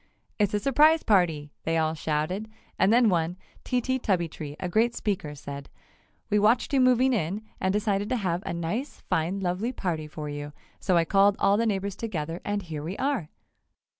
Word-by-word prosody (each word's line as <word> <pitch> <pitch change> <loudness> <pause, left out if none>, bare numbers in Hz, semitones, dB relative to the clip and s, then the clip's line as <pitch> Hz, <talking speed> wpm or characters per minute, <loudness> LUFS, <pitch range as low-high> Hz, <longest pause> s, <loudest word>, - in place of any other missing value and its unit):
"It's 205 0 +2
a - - +2
surprise 300 +7 +4
party!" 165 -8 +2
they 165 0 0
all 160 0 +1
shouted 160 +7 -2 0.3
and 190 +2 +4
then 240 0 +5
one, 175 -2 +1 0.3
Tee 250 -1 0
Tee 260 +2 -1
Tubbytee, 165 - -2
a 180 - -2
great 225 +6 +2
speaker, 180 -8 -2
said: 140 0 -8 0.6
"We 210 - +4
watched 220 +7 +3
you 270 - +4
moving 255 +1 +4
in, 200 0 -1 0.2
and 190 - +1
decided 205 0 0
to 255 - +1
have 180 -5 -1
a - - -4
nice, 170 - -3
fine, 175 +5 0
lovely 190 +6 -1
party 165 -10 -3
for 150 0 -6
you, 145 0 -6 0.3
so 185 -3 +2
I 165 - +3
called 200 +2 +4
all 200 - +3
the 230 +2 +1
neighbors 200 -2 -1
together 170 -6 -4
and 205 -1 -2
here 160 -4 -6
we 170 +6 -5
are!" 265 - -1
190 Hz, 190 wpm, -27 LUFS, 165-220 Hz, 0.6 s, then